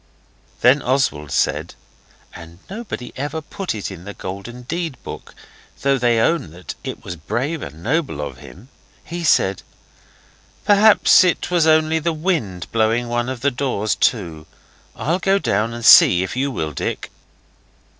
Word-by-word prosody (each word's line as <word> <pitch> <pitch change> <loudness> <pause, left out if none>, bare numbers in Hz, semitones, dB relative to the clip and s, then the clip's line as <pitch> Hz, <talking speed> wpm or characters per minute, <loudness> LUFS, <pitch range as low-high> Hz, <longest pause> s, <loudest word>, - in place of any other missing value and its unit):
Then 130 +4 +5
Oswald 125 - 0
said - - -1 0.6
and 85 0 -12
nobody 200 - -6
ever 145 +4 -3
put 180 - -5
it 100 -1 -5
in 90 -2 -10
the 100 +1 -9
Golden 100 +7 -7
Deed 165 +1 -4
book, - - -9 0.5
though 135 -1 +2
they 120 -1 +2
own 165 - +1
that 90 -2 -8
it - - -6
was 90 - -6
brave 135 - -3
and 75 +4 -9
noble 140 - -1
of 70 -4 -5
him 105 - -14 0.4
he 170 +1 -5
said 95 - +2 1.0
'Perhaps 205 -1 +6
it 180 0 0
was 170 -3 +3
only 160 0 +3
the 165 +1 -1
wind 155 - -2
blowing 115 +2 +1
one 120 +1 -1
of 130 -3 -5
the 140 +2 +2
doors 120 -5 -1
to. 85 -9 -1 0.5
I'll 170 +4 -1
go 195 +1 +2
down 115 - 0
and 120 -1 -6
see, 90 0 +8
if 95 - -5
you 135 +2 0
will, 80 - -3
Dick. - - -4
125 Hz, 155 wpm, -20 LUFS, 95-160 Hz, 1.0 s, see